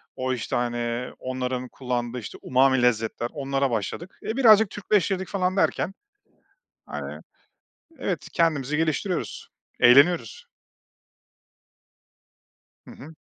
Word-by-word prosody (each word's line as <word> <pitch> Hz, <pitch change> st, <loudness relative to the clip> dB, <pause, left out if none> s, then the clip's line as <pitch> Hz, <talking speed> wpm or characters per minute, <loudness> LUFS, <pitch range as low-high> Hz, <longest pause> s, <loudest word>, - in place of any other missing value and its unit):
o, 130 Hz, 0 st, -1 dB
işte, 120 Hz, -, -3 dB
hani, 120 Hz, 0 st, -2 dB
onların 130 Hz, 0 st, -3 dB
kullandığı, 125 Hz, -1 st, -3 dB
işte, 110 Hz, -, -9 dB
umami 130 Hz, 0 st, +3 dB
lezzetler, 120 Hz, 0 st, 0 dB
onlara 135 Hz, -2 st, -1 dB
başladık. 115 Hz, -, -4 dB
E, 225 Hz, +4 st, -3 dB
birazcık 220 Hz, -5 st, +6 dB
Türkleştirdik 195 Hz, -2 st, 0 dB
falan 185 Hz, -1 st, -1 dB
derken, 195 Hz, -, +1 dB, 0.9 s
hani -, -, -6 dB, 0.8 s
Evet, 180 Hz, -, -3 dB
kendimizi 150 Hz, -4 st, +1 dB
geliştiriyoruz, 165 Hz, +4 st, -2 dB, 0.3 s
eğleniyoruz. 130 Hz, 0 st, +4 dB, 2.4 s
Hı -, -, -10 dB
hı. 155 Hz, +3 st, -12 dB
135 Hz, 100 wpm, -25 LUFS, 125-180 Hz, 2.4 s, birazcık